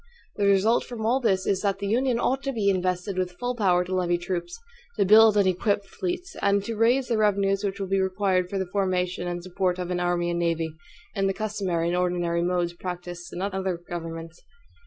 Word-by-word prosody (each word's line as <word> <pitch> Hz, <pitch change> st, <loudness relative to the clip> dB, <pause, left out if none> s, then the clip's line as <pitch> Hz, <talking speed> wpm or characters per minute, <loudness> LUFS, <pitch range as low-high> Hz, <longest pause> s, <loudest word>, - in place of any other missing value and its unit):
The 200 Hz, -1 st, +2 dB
result 200 Hz, +4 st, +3 dB
from 230 Hz, -3 st, -6 dB
all 245 Hz, +4 st, +3 dB
this 190 Hz, -7 st, +1 dB
is 195 Hz, -1 st, +1 dB
that 200 Hz, -2 st, 0 dB
the 200 Hz, -, -5 dB
Union 240 Hz, +3 st, +1 dB
ought 265 Hz, +2 st, +1 dB
to 275 Hz, -, 0 dB
be 210 Hz, -5 st, +1 dB
invested 185 Hz, +1 st, -1 dB
with 180 Hz, -1 st, -2 dB
full 245 Hz, 0 st, -1 dB
power 185 Hz, -5 st, +3 dB
to 180 Hz, +1 st, -5 dB
levy 175 Hz, -1 st, +1 dB
troops; 175 Hz, 0 st, -4 dB, 0.4 s
to -, -, +3 dB
build 215 Hz, +1 st, +7 dB
and 200 Hz, -, +4 dB
equip 200 Hz, +2 st, +1 dB
fleets; 360 Hz, -, -5 dB
and 200 Hz, 0 st, +2 dB
to 225 Hz, +2 st, -4 dB
raise 245 Hz, +4 st, +2 dB
the 230 Hz, -2 st, +1 dB
revenues 200 Hz, -1 st, +2 dB
which 200 Hz, 0 st, -2 dB
will 195 Hz, -, -2 dB
be 195 Hz, 0 st, +1 dB
required 190 Hz, -1 st, +1 dB
for 195 Hz, -, -3 dB
the 190 Hz, -, -1 dB
formation 180 Hz, -1 st, -1 dB
and 175 Hz, 0 st, -4 dB
support 185 Hz, 0 st, -1 dB
of 180 Hz, 0 st, -4 dB
an 180 Hz, -, -1 dB
army 175 Hz, -1 st, 0 dB
and 170 Hz, -, -1 dB
navy, 165 Hz, -2 st, -1 dB, 0.4 s
in 195 Hz, -2 st, 0 dB
the 195 Hz, -, -1 dB
customary 195 Hz, -6 st, -1 dB
and 175 Hz, -, 0 dB
ordinary 175 Hz, -1 st, 0 dB
modes 175 Hz, -1 st, 0 dB
practiced 175 Hz, -1 st, -7 dB
in 180 Hz, -, -4 dB
other 190 Hz, -2 st, -2 dB
governments. 165 Hz, -1 st, -7 dB
190 Hz, 215 wpm, -26 LUFS, 175-205 Hz, 0.4 s, build